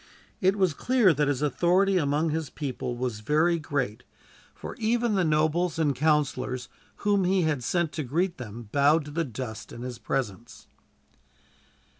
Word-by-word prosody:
It 190 Hz, +1 st, +3 dB
was 190 Hz, -6 st, +2 dB
clear 235 Hz, -, +3 dB
that 150 Hz, 0 st, +1 dB
his 145 Hz, 0 st, 0 dB
authority 180 Hz, +7 st, +3 dB
among 150 Hz, +1 st, +1 dB
his 160 Hz, -2 st, -2 dB
people 130 Hz, -4 st, -4 dB
was 120 Hz, -3 st, -3 dB
very 155 Hz, +8 st, +2 dB
great, 135 Hz, -7 st, -2 dB, 0.5 s
for -, -, -7 dB
even 230 Hz, 0 st, +1 dB
the 190 Hz, -2 st, +2 dB
nobles 160 Hz, +2 st, +1 dB
and 150 Hz, -4 st, +1 dB
councilors 135 Hz, -4 st, 0 dB, 0.4 s
whom 200 Hz, -2 st, +3 dB
he 185 Hz, 0 st, +2 dB
had 150 Hz, -5 st, 0 dB
sent 170 Hz, +4 st, 0 dB
to 155 Hz, -, -3 dB
greet 170 Hz, +7 st, -1 dB
them 115 Hz, -1 st, -8 dB
bowed 145 Hz, +2 st, +3 dB
to 145 Hz, -, -8 dB
the 165 Hz, +3 st, 0 dB
dust 115 Hz, -4 st, -7 dB
in 120 Hz, -, -8 dB
his 125 Hz, -2 st, -6 dB
presence. 120 Hz, -2 st, -4 dB
150 Hz, 160 wpm, -27 LUFS, 130-175 Hz, 0.5 s, It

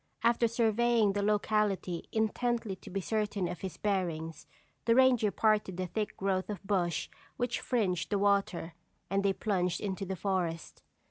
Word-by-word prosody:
After 235 Hz, 0 st, +4 dB
surveying 230 Hz, -2 st, +2 dB
the 205 Hz, -, 0 dB
locality 205 Hz, -4 st, 0 dB
intently 225 Hz, -1 st, 0 dB
to -, -, -12 dB
be 195 Hz, +1 st, -2 dB
certain 205 Hz, -2 st, -1 dB
of 175 Hz, +1 st, -5 dB
his 190 Hz, -2 st, -5 dB
bearings, 165 Hz, -6 st, -2 dB, 0.4 s
the 230 Hz, 0 st, +4 dB
ranger 255 Hz, -4 st, +5 dB
parted 210 Hz, -3 st, +1 dB
the 185 Hz, -, -1 dB
thick 210 Hz, +4 st, -3 dB
growth 190 Hz, 0 st, -1 dB
of 205 Hz, -3 st, -5 dB
bush 180 Hz, -5 st, 0 dB, 0.3 s
which 245 Hz, 0 st, -1 dB
fringed 185 Hz, -9 st, 0 dB
the 205 Hz, -, +1 dB
water, 200 Hz, -4 st, +1 dB, 0.4 s
and 195 Hz, 0 st, +2 dB
they 200 Hz, -, +3 dB
plunged 180 Hz, -4 st, 0 dB
into 195 Hz, -1 st, -3 dB
the 190 Hz, -, -2 dB
forest. 180 Hz, -4 st, -2 dB
200 Hz, 155 wpm, -31 LUFS, 185-220 Hz, 0.4 s, ranger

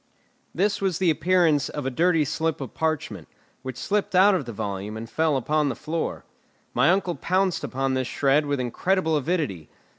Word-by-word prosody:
This 200 Hz, +4 st, +1 dB
was 190 Hz, -4 st, 0 dB
the 180 Hz, -3 st, +3 dB
appearance 160 Hz, -2 st, +2 dB
of 145 Hz, -3 st, -5 dB
a 135 Hz, -, -1 dB
dirty 165 Hz, +2 st, +2 dB
slip 160 Hz, +2 st, -1 dB
of 135 Hz, -5 st, -7 dB
parchment, 145 Hz, -, -2 dB, 0.3 s
which 130 Hz, -2 st, -6 dB
slipped 205 Hz, -2 st, -1 dB
out 195 Hz, +3 st, +6 dB
of 180 Hz, -8 st, -1 dB
the 120 Hz, -, -6 dB
volume 100 Hz, 0 st, -4 dB
and 115 Hz, +1 st, -6 dB
fell 155 Hz, +3 st, +1 dB
upon 150 Hz, +3 st, +1 dB
the 125 Hz, -, -3 dB
floor. 165 Hz, +1 st, -4 dB, 0.5 s
My -, -, +3 dB
uncle 185 Hz, -1 st, +2 dB
pounced 185 Hz, +1 st, 0 dB
upon 135 Hz, 0 st, -1 dB
this 130 Hz, -1 st, -1 dB
shred 145 Hz, +2 st, +2 dB
with 145 Hz, -1 st, -1 dB
incredible 160 Hz, +7 st, 0 dB
avidity. 145 Hz, -, -2 dB
155 Hz, 180 wpm, -25 LUFS, 130-180 Hz, 0.5 s, out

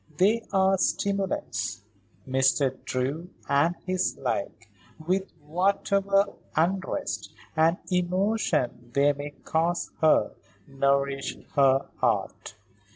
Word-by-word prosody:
They 210 Hz, +6 st, +3 dB
are 190 Hz, -1 st, +3 dB
stimulants. 185 Hz, -, -1 dB, 0.4 s
Mr. 130 Hz, 0 st, +2 dB
Drew 140 Hz, +7 st, -2 dB, 0.2 s
and 145 Hz, +5 st, +2 dB
his 185 Hz, 0 st, 0 dB
like, 115 Hz, -3 st, -3 dB, 0.3 s
with 185 Hz, +4 st, -1 dB
whatever 195 Hz, +4 st, +2 dB, 0.3 s
unrest 185 Hz, +4 st, -1 dB, 0.2 s
and 165 Hz, +2 st, +3 dB
emotion 180 Hz, -, 0 dB
they 140 Hz, +1 st, +4 dB
may 145 Hz, +1 st, -6 dB
cause 165 Hz, +3 st, -1 dB
her, 155 Hz, -1 st, +4 dB, 0.4 s
nourish 140 Hz, 0 st, 0 dB, 0.2 s
her 135 Hz, -1 st, +4 dB
art. -, -, -1 dB
160 Hz, 95 wpm, -27 LUFS, 135-190 Hz, 0.4 s, they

